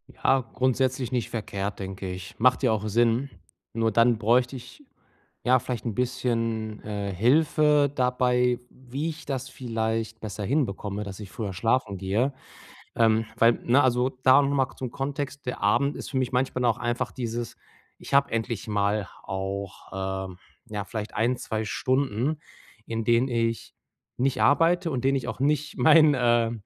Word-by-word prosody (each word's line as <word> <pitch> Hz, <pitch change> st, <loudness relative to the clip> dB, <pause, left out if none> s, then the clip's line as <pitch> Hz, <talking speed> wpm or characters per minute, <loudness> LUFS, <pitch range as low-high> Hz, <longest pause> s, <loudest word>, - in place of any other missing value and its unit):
Ja, 135 Hz, 0 st, +2 dB
grundsätzlich 130 Hz, 0 st, 0 dB
nicht 125 Hz, -3 st, -1 dB
verkehrt, 100 Hz, -3 st, -4 dB
denke 95 Hz, -1 st, -5 dB
ich. 90 Hz, -1 st, -8 dB
Macht 125 Hz, +3 st, +4 dB
ja 125 Hz, -, +4 dB
auch 110 Hz, -1 st, -1 dB
Sinn. 120 Hz, +5 st, +2 dB, 0.4 s
Nur 115 Hz, 0 st, +1 dB
dann 115 Hz, +2 st, +4 dB
bräuchte 120 Hz, +4 st, +2 dB
ich, 130 Hz, -, -11 dB, 0.6 s
ja, 130 Hz, +1 st, +4 dB
vielleicht 120 Hz, -2 st, -5 dB
'n 115 Hz, -, -2 dB
bisschen, 115 Hz, -3 st, -2 dB
äh, 100 Hz, -2 st, -4 dB
Hilfe 145 Hz, -, +3 dB
dabei, 125 Hz, -1 st, +2 dB
wie 130 Hz, +5 st, -5 dB
ich 155 Hz, -1 st, -8 dB
das 130 Hz, -2 st, -3 dB
vielleicht 110 Hz, -2 st, -3 dB
besser 105 Hz, -1 st, -5 dB
hinbekomme, 105 Hz, -5 st, -1 dB
dass 100 Hz, -1 st, -8 dB
ich 105 Hz, -3 st, -8 dB
früher 105 Hz, -4 st, -4 dB
schlafen 110 Hz, +1 st, 0 dB
gehe, 105 Hz, +9 st, 0 dB, 0.6 s
ähm. 115 Hz, -1 st, +3 dB
Weil, 115 Hz, +1 st, +6 dB
ne, 130 Hz, +4 st, +4 dB
also 125 Hz, -1 st, +2 dB
da 130 Hz, +2 st, +7 dB
noch 140 Hz, -, 0 dB
mal 135 Hz, -2 st, 0 dB
zum 125 Hz, -2 st, -5 dB
Kontext: 140 Hz, +1 st, -4 dB
Der 125 Hz, -, -4 dB
Abend 140 Hz, +8 st, +2 dB
ist -, -, -7 dB
für 135 Hz, -, -2 dB
mich 130 Hz, -2 st, 0 dB
manchmal 130 Hz, 0 st, 0 dB
dann 120 Hz, -1 st, +4 dB
auch -, -, -9 dB
einfach 120 Hz, 0 st, -2 dB
dieses 120 Hz, -1 st, -4 dB, 0.4 s
ich -, -, -10 dB
habe 140 Hz, 0 st, +4 dB
endlich 115 Hz, -2 st, -2 dB
mal 105 Hz, -1 st, 0 dB, 0.2 s
auch, 95 Hz, 0 st, -5 dB, 0.4 s
ähm, 90 Hz, -1 st, -11 dB, 0.3 s
ja, 105 Hz, -3 st, -4 dB
vielleicht 110 Hz, +1 st, -6 dB
1, 120 Hz, +3 st, +1 dB
2 110 Hz, -2 st, -3 dB
Stunden, 130 Hz, +5 st, 0 dB, 0.5 s
in 115 Hz, -1 st, -3 dB
denen 120 Hz, +3 st, +3 dB
ich 115 Hz, -1 st, -1 dB, 0.4 s
nicht 130 Hz, +1 st, 0 dB
arbeite 165 Hz, +3 st, +3 dB
und 130 Hz, -, -1 dB
in -, -, -2 dB
denen 135 Hz, +1 st, +3 dB
ich 130 Hz, -2 st, -2 dB
auch 120 Hz, -2 st, -5 dB
nicht 150 Hz, +2 st, 0 dB
mein, 155 Hz, -1 st, +6 dB
äh 120 Hz, -3 st, +2 dB
120 Hz, 170 wpm, -26 LUFS, 110-130 Hz, 0.6 s, da